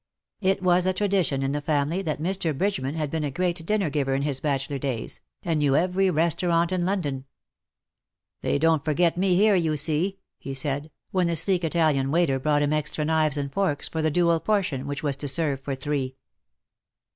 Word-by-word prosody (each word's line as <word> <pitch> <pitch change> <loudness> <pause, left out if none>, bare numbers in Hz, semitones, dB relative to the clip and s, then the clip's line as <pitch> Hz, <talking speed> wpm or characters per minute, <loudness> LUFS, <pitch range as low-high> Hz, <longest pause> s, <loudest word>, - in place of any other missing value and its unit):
It 190 -1 +1
was 180 0 +3
a 185 - +2
tradition 185 -8 0
in 135 - 0
the 145 +1 -2
family 150 +4 0
that 155 -6 -3
Mr. 165 -3 -1
Bridgeman 150 -7 -1
had 155 -3 -2
been 160 -1 -2
a 145 - -1
great 175 +3 -2
dinner 205 -7 +1
giver 135 -2 0
in 135 - -1
his 140 -2 -1
bachelor 140 -1 -2
days, 125 -5 -4 0.2
and 165 -3 0
knew 140 -2 +2
every 185 +4 +2
restaurant 170 +1 +1
in 185 -1 0
London. 145 -9 -2 1.2
"They - - 0
don't 160 0 +2
forget 165 +2 +2
me 185 0 +2
here, 210 +3 +5
you 160 -5 +1
see,^'' 160 +6 +1 0.2
he 135 0 -6
said, 145 +2 -2 0.2
when 185 -2 +1
the 170 - 0
sleek 180 +2 +1
Italian 155 -5 +1
waiter 150 -4 +2
brought 145 +1 +2
him 145 +1 +1
extra 150 0 -1
knives 155 -2 +1
and 140 -1 -3
forks 190 -8 -1
for 160 - -2
the 155 - +2
dual 170 +1 +2
portion 170 -10 -1
which 145 +1 -4
Avas 140 -2 0
to 145 - -4
serve 140 -1 +1
for 135 0 -3
three. 135 -1 -3
155 Hz, 195 wpm, -25 LUFS, 140-180 Hz, 1.2 s, here